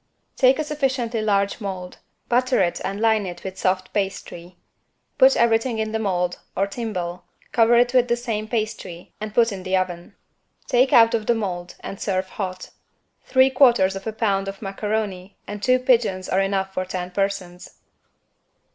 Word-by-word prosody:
Take 260 0 +4
a 310 - -1
sufficiently 260 -6 -1
large 200 +1 0
mold, 185 -3 -6 0.3
butter 250 +1 +2
it 175 -2 0
and 195 +1 -3
line 220 -3 +2
it 175 -1 -8
with 190 0 -7
soft 185 0 -1
pastry. 190 -3 -4 0.6
Put 265 +1 +6
everything 230 +1 +2
in 220 0 -2
the 220 - -1
mold, 180 -4 -1 0.2
or 195 - +2
timbale, 185 -5 -5 0.3
cover 230 0 +4
it 245 +1 +3
with 250 -1 +4
the 235 - +2
same 225 -3 -3
pastry 215 -6 -4
and 215 0 -4
put 230 +1 +3
in 195 -2 -6
the 185 +1 0
oven. 175 -2 -4 0.5
Take 255 +2 +3
out 230 -1 +6
of 220 -2 -1
the 235 - +3
mold 180 -5 -4
and 195 - -8
serve 185 -2 -1
hot. 185 -2 -6 0.5
Three 260 0 +4
quarters 235 -8 +4
of 195 +2 -7
a - - -1
pound 200 -3 0
of 195 0 -6
macaroni 200 -1 -4
and 205 0 -7
two 255 +3 +4
pigeons 230 -7 +1
are 190 - +1
enough 195 -1 -1
for 185 - -1
ten 180 -1 -5
persons. 195 -2 -3
205 Hz, 175 wpm, -22 LUFS, 185-235 Hz, 0.6 s, Put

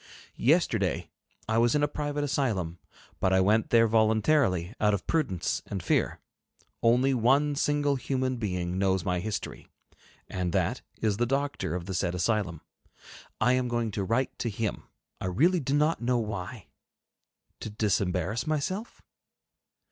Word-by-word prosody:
Yesterday 105 - +1 0.4
I 110 +1 +2
was 120 +2 +3
in 145 - +2
a - - +4
private 145 0 -3
asylum, 110 - -1 0.4
but 95 - +2
I 95 - +4
went 105 +4 +3
there 115 -1 +5
voluntarily, 110 - +2
out 105 -1 +3
of 95 - -6
prudence 135 - 0
and - - -4
fear. - - +1 0.6
Only 125 +4 +4
one 135 +5 +3
single 145 0 +1
human 130 0 -1
being 90 -4 -2
knows 95 -2 +1
my 90 -1 0
history, 105 +3 -5 0.6
and 90 -2 -3
that - - 0 0.2
is 105 -2 +1
the 120 +1 +1
doctor 140 - -1
of 90 -1 -4
the 95 - -5
said 90 -1 -1
asylum. 90 -3 0 0.8
I 125 +3 +3
am 130 -1 +1
going 120 -2 -1
to 100 0 -2
write 115 +7 0
to 120 - -1
him. 110 0 -3 0.3
I 95 - -3
really 165 - +3
do 140 -1 -1
not 150 0 +2
know 125 +1 +1
why? 105 0 -4 0.9
To - - -5
disembarrass 105 - -1
myself? 185 +9 -3
115 Hz, 150 wpm, -28 LUFS, 95-135 Hz, 0.9 s, there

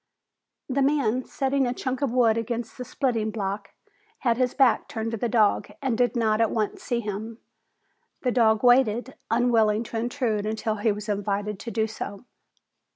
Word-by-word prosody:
The 275 +1 0
man, 265 -4 +1
setting 270 -1 0
a 245 - -2
chunk 260 0 -3
of 275 -4 +1
wood 235 -3 +4
against 230 0 -3
the 250 - -6
splitting 235 -3 -1
block, 200 -2 -4 0.5
had 235 -3 +2
his 250 -1 0
back 265 -5 +3
turned 225 0 -4
to 230 - -2
the 235 +2 -1
dog 220 -3 +2
and 265 -4 0
did 245 +2 +1
not 220 -2 +2
at 225 - +3
once 215 -2 -2
see 240 -3 -1
him. 215 +1 -5 0.9
The 250 - +2
dog 220 -2 +3
waited, 245 0 +4 0.2
unwilling 225 -2 +3
to 230 - -6
intrude 230 -3 -1
until 220 0 -2
he 210 +2 +2
was 210 +1 -5
invited 205 0 -2
to 235 - -6
do 220 0 0
so. 210 0 -7
230 Hz, 175 wpm, -25 LUFS, 215-250 Hz, 0.9 s, wood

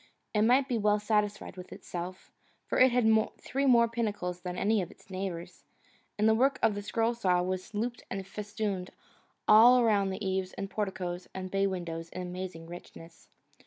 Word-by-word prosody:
It 210 - +2
might 255 +5 +4
well 210 -3 +3
be 210 - -9
satisfied 210 -2 0
with 180 - -9
itself, 180 +1 -7 0.3
for - - -1
it 255 0 +7
had 240 -2 +3 0.3
three 275 +2 -1
more 235 -2 +6
pinnacles 205 -6 -3
than 180 0 -5
any 210 +2 +2
of 175 - -5
its - - -18
neighbours, 185 -3 -5 0.5
and 215 +1 +3
the 220 - +6
work 265 +4 +3
of 225 -2 +4
the 205 - -4
scroll 225 +3 0
saw 180 -6 +1
was 185 0 -3
looped 235 +3 -2
and 195 0 -4
festooned 205 -2 -4 0.6
all 235 +4 +8
around 210 -5 +3
the 190 +2 -4
eaves 190 0 -1
and 195 0 -6
porticoes 185 -4 -3
and 185 -1 -5
bay 195 0 +2
windows 170 -3 -4
in 185 - -6
amazing 180 -2 -6
richness. 165 -1 -12
195 Hz, 180 wpm, -30 LUFS, 180-220 Hz, 0.6 s, all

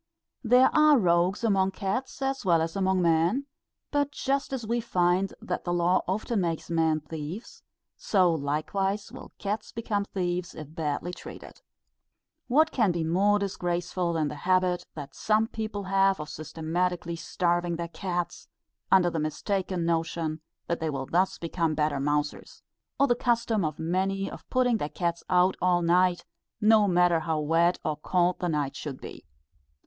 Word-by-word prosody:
There 250 +2 +5
are 305 -1 +6
rogues 180 0 +2
among 195 -3 +2
cats 230 +9 -3
as 270 0 -1
well 170 -4 +4
as 165 0 -4
among 190 -1 +1
men; 170 +11 +2 0.5
but 290 -1 +1
just 275 -1 -1
as 260 -4 -3
we 235 +2 0
find 185 -2 +1
that - - -4
the 175 - -2
law 175 +1 +2
often 210 +3 -1
makes 170 -1 -3
men 160 -2 +2
thieves, 160 +7 -7 0.4
so 185 -4 +3
likewise 190 +8 -2
will - - -11
cats 205 +1 -4
become 215 -3 -2
thieves 180 -2 -3
if 155 0 -9
badly 160 +2 -3
treated. - - -11 0.9
What 310 +5 +4
can 220 -7 +2
be 170 -1 -2
more 195 +6 +3
disgraceful 175 -2 -2
than 160 -2 0
the 150 - -6
habit 185 -1 +1
that 140 -3 -8
some 215 0 +2
people 215 -2 -5
have 195 0 +2
of 150 0 -6
systematically 170 +2 -2
starving 175 0 -1
their 170 0 -4
cats, 175 0 -4 0.4
under 180 -2 +5
the 165 - -2
mistaken 180 +3 -2
notion 165 -1 -1 0.2
that 170 - -2
they 160 -1 -1
will 135 -2 -3
thus 180 +6 +1
become 165 -2 -1
better 150 -2 0
mousers; 145 +1 -2 0.4
or 280 - +6
the 245 - +3
custom 235 -4 0
of 155 -2 -2
many 190 +4 -1
of - - -11
putting 250 -2 +2
their 150 - -3
cats 170 0 -2
out 180 +1 +4
all 175 -1 +3
night, 180 +1 +2 0.3
no 215 -1 +5
matter 175 -2 +3
how 160 -1 -1
wet 165 +4 +2
or 155 - 0
cold 180 +3 +1
the 180 - -1
night 145 -3 -1
should 140 -4 -6
be. - - -10
180 Hz, 165 wpm, -27 LUFS, 165-200 Hz, 0.9 s, are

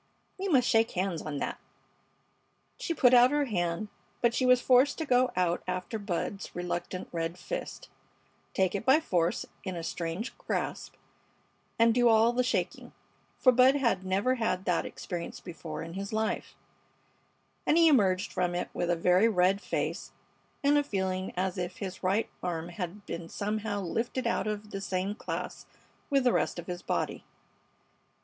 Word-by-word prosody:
We 390 - -2
must 265 -9 +4
shake 225 0 +4
hands 185 -3 -1
on 150 -2 -4
that." - - -3 1.2
She 335 - -2
put 255 -3 +5
out 245 0 +8
her 290 0 +1
hand, 175 -3 -1 0.3
but 235 -1 +2
she 255 +2 +1
was 250 0 +6
forced 255 +3 +4
to 320 - -2
go 255 -2 +3
out 180 -1 +1
after 185 +4 -3
Bud's 200 0 -4
reluctant 175 +1 -4
red 165 0 -3
fist, - - -6 0.7
take 190 -1 +2
it 200 - -2
by 265 +5 +5
force 175 - 0 0.2
in 185 -2 -4
a 170 - -5
strange 170 +7 -4
grasp, - - -3 0.8
and 230 -1 +5
do 245 0 +4
all 225 +1 +5
the 250 +1 +2
shaking; 250 - -2 0.4
for 255 - +6
Bud 255 +2 +6
had 235 -9 +1
never 195 +7 +1
had 225 -7 -1
that 175 -2 +1
experience 175 -3 -6
before 160 -3 -7
in 165 0 -8
his 195 +2 -5
life, 220 0 -2 1.1
and 310 - +4
he 335 -1 +7
emerged 195 -10 +3
from 180 -1 0
it 180 - -3
with 175 - -1
a 175 - +3
very 180 +5 +4
red 195 -1 +3
face - - -3 0.5
and 290 +1 +5
a - - +1
feeling 190 -6 -2
as 185 0 -1
if 175 0 -4
his 190 -1 -6
right 195 +4 +1
arm 170 -2 -3
had 180 +3 -6
been 170 0 -6
somehow 210 0 -2
lifted 230 +7 -2
out 230 -3 0
of 210 0 -4
the 195 - -4
same 190 +1 -1
class - - -5 0.4
with 275 -2 +3
the 245 - +3
rest - - 0
of 175 - -6
his 175 0 -5
body. - - -2
195 Hz, 170 wpm, -29 LUFS, 180-245 Hz, 1.2 s, out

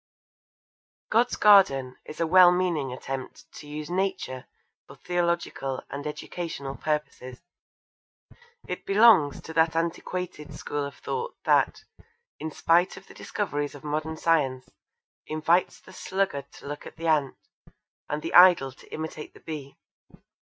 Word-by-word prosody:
God's 235 +2 +3
Garden 140 -12 +5
is 155 - -10
a 165 - +2
well 180 +1 +7
meaning 175 -7 0
attempt 130 +1 -7
to 150 - -11
use 150 +1 -6
Nature 185 -9 -2 0.4
for - - -13
theological 170 -6 -2
and 145 +2 -5
educational 150 -3 -5
purposes. 150 -4 -4 1.3
It - - -5
belongs 195 -8 +5
to 160 - -9
that 160 0 +2
antiquated 165 -1 -3
school 145 -1 -3
of 140 0 -8
thought 470 - -4
that, - - +2 0.6
in 160 - -4
spite 170 +4 +2
of 190 - -12
the - - -15
discoveries 145 -8 -3
of 145 - -12
modern 155 +1 -3
science, 140 -6 +1 0.6
invites 160 +3 +1
the 185 - -16
sluggard 190 -10 -2
to - - -14
look 145 0 -6
at - - -12
the 165 - -6
ant, 150 -4 +2 0.7
and 150 +1 -3
the - - -4
idle 175 -7 +7
to 130 - -19
imitate 155 -1 -6
the - - -14
bee. 145 -4 -8
155 Hz, 140 wpm, -26 LUFS, 145-180 Hz, 1.3 s, well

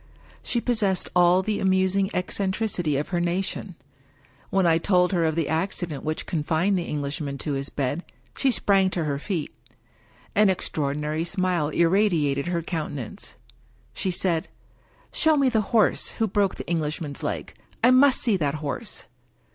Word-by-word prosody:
She 240 - -1
possessed 215 -6 0
all 180 +1 +5
the 210 +1 -1
amusing 190 +1 +2
eccentricity 190 -4 -1
of 145 - -3
her 175 - 0
nation. 180 +1 -2 0.7
When 190 -1 +2
I 165 -1 +4
told 180 0 +2
her 175 -3 +1
of 160 -1 0
the 165 -3 0
accident 165 -3 -2
which 155 0 -3
confined 165 +4 0
the 175 -2 -1
Englishman 145 -1 -3
to 145 +2 -3
his 135 0 -3
bed, 145 +5 -2 0.3
she 275 - +2
sprang 195 -5 +3
to 170 - 0
her 140 -2 -2
feet. 170 -1 -3 0.8
An 210 -1 +4
extraordinary 150 -3 -1
smile 180 -4 0
irradiated 165 -5 +2
her 170 -1 -1
countenance. 150 - -5 0.6
She 190 - -2
said, 175 -2 +1 0.3
" - - -35 0.3
Show 315 -2 +3
me 275 -2 +3
the 225 -3 +2
horse 225 -4 +3
who 225 - +1
broke 200 -1 +1
the - - -7
Englishman's 155 -3 -2
leg! - - -4 0.3
I 250 - +7
must 260 +1 +5
see 225 -5 +2
that 145 -4 -1
horse 150 -2 -5
175 Hz, 155 wpm, -25 LUFS, 155-195 Hz, 0.8 s, I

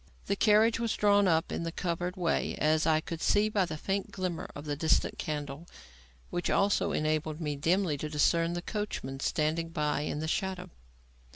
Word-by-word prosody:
The 200 - 0
carriage 215 +2 +4
was 230 -2 0
drawn 205 -1 +4
up 165 -2 +2
in - - -2
the 165 0 -3
covered 175 +1 -2
way 175 -3 0
as 155 +1 +2
I 155 -1 +3
could 165 0 -6
see 210 +1 +3
by 205 -3 +2
the 155 -2 -5
faint 195 +5 -2
glimmer 185 -3 -3
of 145 - -8
the 145 -1 -2
distant 155 +2 +1
candle; 150 +1 -4 0.6
which 175 - -1
also 200 +1 +2
enabled 155 0 -1
me 150 -3 -2
dimly 165 +1 +1
to 155 - -3
discern 165 +3 +2
the 175 0 -4
coachman 190 - -4
standing 155 +3 0
close 165 - -16
by 150 -2 0
in 150 - -3
the 155 +1 -3
shadow. 185 0 -2
165 Hz, 190 wpm, -30 LUFS, 155-190 Hz, 0.6 s, carriage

